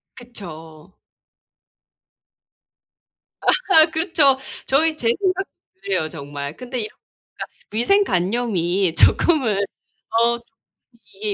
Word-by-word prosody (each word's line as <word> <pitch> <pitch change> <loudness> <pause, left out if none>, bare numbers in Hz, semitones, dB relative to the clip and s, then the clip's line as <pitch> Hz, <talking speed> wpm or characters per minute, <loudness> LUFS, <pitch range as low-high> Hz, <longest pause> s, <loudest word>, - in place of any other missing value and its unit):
그쵸. 170 -8 -12 2.5
아하 380 -10 +5
그쵸. 315 -5 +3 0.3
저희 310 +4 +2
제 235 - -2
생각도 385 -1 -1 0.3
그래요 275 - -1
정말. 145 -1 -7
근데 250 0 -5
이렇 215 -1 -2 0.5
그러니까 - - -3 0.3
위생 395 - +3
관념이 185 - 0
조금은 260 - +3 0.5
어 235 +1 +2
좀 235 - -26 0.7
이게 205 +1 -3
235 Hz, 195 characters per minute, -21 LUFS, -, 2.5 s, 아하